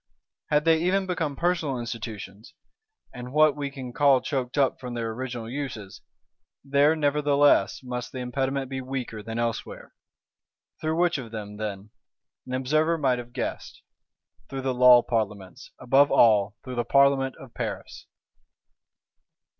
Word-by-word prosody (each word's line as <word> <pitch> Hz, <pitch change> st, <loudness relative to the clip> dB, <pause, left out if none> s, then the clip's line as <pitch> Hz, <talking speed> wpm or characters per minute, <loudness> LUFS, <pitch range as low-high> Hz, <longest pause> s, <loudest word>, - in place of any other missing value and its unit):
Had 150 Hz, +1 st, +2 dB
they 160 Hz, -1 st, +4 dB
even 190 Hz, +2 st, +1 dB
become 165 Hz, -6 st, -2 dB
personal 165 Hz, -5 st, 0 dB
Institutions, 115 Hz, -, -7 dB, 0.6 s
and 125 Hz, 0 st, -8 dB
what 155 Hz, 0 st, +4 dB
we 145 Hz, -1 st, -3 dB
can 130 Hz, -3 st, -8 dB
call 140 Hz, -2 st, +4 dB
choked 130 Hz, -1 st, -3 dB
up 135 Hz, -2 st, +2 dB
from 125 Hz, -2 st, -6 dB
their 115 Hz, -1 st, -3 dB
original 120 Hz, -1 st, -5 dB
uses, 125 Hz, -6 st, -6 dB, 0.6 s
there 140 Hz, +3 st, +3 dB
nevertheless 145 Hz, -6 st, +2 dB
must 125 Hz, -1 st, -5 dB
the -, -, -8 dB
impediment 130 Hz, +2 st, -2 dB
be 130 Hz, 0 st, -5 dB
weaker 125 Hz, -4 st, -5 dB
than 115 Hz, +2 st, -6 dB
elsewhere. 115 Hz, -1 st, -4 dB, 0.9 s
Through 160 Hz, +1 st, -1 dB
which 175 Hz, -3 st, +2 dB
of 120 Hz, -3 st, -8 dB
them 105 Hz, -2 st, -7 dB
then? 105 Hz, -1 st, -6 dB, 0.6 s
An 130 Hz, -, -3 dB
observer 155 Hz, +6 st, +1 dB
might 130 Hz, -5 st, +1 dB
have 120 Hz, 0 st, -9 dB
guessed: 125 Hz, -, -5 dB, 0.7 s
Through 135 Hz, 0 st, -5 dB
the 130 Hz, -1 st, -1 dB
Law 125 Hz, -1 st, +7 dB
Parlements; 105 Hz, -5 st, -3 dB
above 135 Hz, +3 st, +4 dB
all, 105 Hz, -3 st, +4 dB
through 130 Hz, -1 st, -7 dB
the 120 Hz, -, +1 dB
Parlement 140 Hz, 0 st, +3 dB
of 130 Hz, -3 st, -14 dB
Paris. -, -, -6 dB
130 Hz, 145 wpm, -26 LUFS, 120-145 Hz, 0.9 s, Law